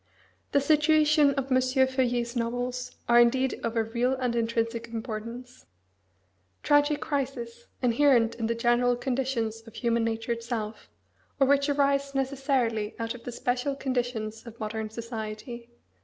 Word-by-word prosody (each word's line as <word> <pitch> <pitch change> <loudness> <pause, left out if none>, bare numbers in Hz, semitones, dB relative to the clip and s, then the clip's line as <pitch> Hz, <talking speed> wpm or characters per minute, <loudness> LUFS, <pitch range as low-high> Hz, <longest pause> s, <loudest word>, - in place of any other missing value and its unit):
The 285 - +4
situations 300 0 +4
of 275 -1 -3
M. 255 0 +4
Feuillet's 255 -2 +1
novels 245 +1 -3
are 240 0 +6
indeed 255 +2 +3
of 230 0 -2
a 225 - +2
real 240 +3 0
and 250 -2 -1
intrinsic 230 0 -1
importance: 230 +2 -7 1.0
tragic 290 0 +3
crises, 250 -5 -3 0.2
inherent 240 -2 +4
in 225 -2 -3
the 230 - 0
general 240 +1 +2
conditions 245 -3 -2
of 225 - -13
human 235 -1 +1
nature 225 +1 -2
itself, 230 -2 -4 0.5
or 270 - +5
which 280 +1 +3
arise 280 -1 +1
necessarily 260 -5 0
out 230 0 -3
of 245 - -12
the 245 - -4
special 250 +3 -1
conditions 245 -4 -3
of 230 0 -11
modern 215 0 -3
society. 230 +1 -6
245 Hz, 140 wpm, -27 LUFS, 230-265 Hz, 1.0 s, are